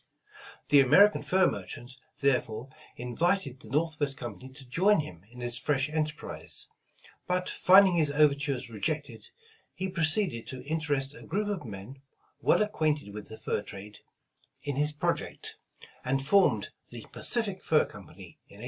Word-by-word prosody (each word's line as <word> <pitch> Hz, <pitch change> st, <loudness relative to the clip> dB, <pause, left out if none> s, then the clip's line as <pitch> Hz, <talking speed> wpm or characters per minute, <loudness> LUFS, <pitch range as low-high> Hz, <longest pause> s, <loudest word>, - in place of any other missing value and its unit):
The 145 Hz, -, +7 dB
American 200 Hz, +11 st, +6 dB
fur 190 Hz, 0 st, +3 dB
merchant, 120 Hz, -, -4 dB, 0.3 s
therefore, 125 Hz, -3 st, 0 dB, 0.3 s
invited 135 Hz, +3 st, 0 dB
the 110 Hz, -, -12 dB
Northwest 150 Hz, 0 st, 0 dB
Com 120 Hz, -5 st, -6 dB
pany 130 Hz, 0 st, -12 dB
to 135 Hz, -2 st, -10 dB
join 185 Hz, +7 st, +3 dB
him 90 Hz, -, -10 dB
in 125 Hz, -, -16 dB
this 120 Hz, 0 st, -2 dB
fresh 135 Hz, +2 st, 0 dB
enterprise, 155 Hz, -1 st, -4 dB, 0.6 s
but 180 Hz, 0 st, 0 dB
finding 190 Hz, -1 st, +6 dB
his 155 Hz, -3 st, +3 dB
overtures 145 Hz, -3 st, +1 dB
rejected, 115 Hz, -1 st, -4 dB, 0.5 s
he 190 Hz, -, -2 dB
proceeded 165 Hz, -, 0 dB
to 130 Hz, -2 st, -7 dB
interest 145 Hz, -3 st, -1 dB
a -, -, -12 dB
group 205 Hz, +1 st, -1 dB
of 185 Hz, -, -3 dB
men, 105 Hz, +7 st, -9 dB, 0.4 s
well -, -, +4 dB
acquainted 155 Hz, -, -1 dB
with 105 Hz, 0 st, -8 dB
the 110 Hz, -, -8 dB
fur -, -, -2 dB
trade, 105 Hz, +1 st, -10 dB, 0.6 s
in 145 Hz, -1 st, -2 dB
his 150 Hz, +2 st, +1 dB
project, 150 Hz, -, -3 dB, 0.5 s
and 135 Hz, +1 st, 0 dB
formed 135 Hz, -, +3 dB, 0.2 s
the 120 Hz, -2 st, -9 dB
Pacific 205 Hz, -6 st, -1 dB
Fur 155 Hz, -, +3 dB
Company -, -, -13 dB
in 100 Hz, -, -16 dB
1810. -, -, -15 dB
145 Hz, 150 wpm, -29 LUFS, 120-165 Hz, 0.6 s, The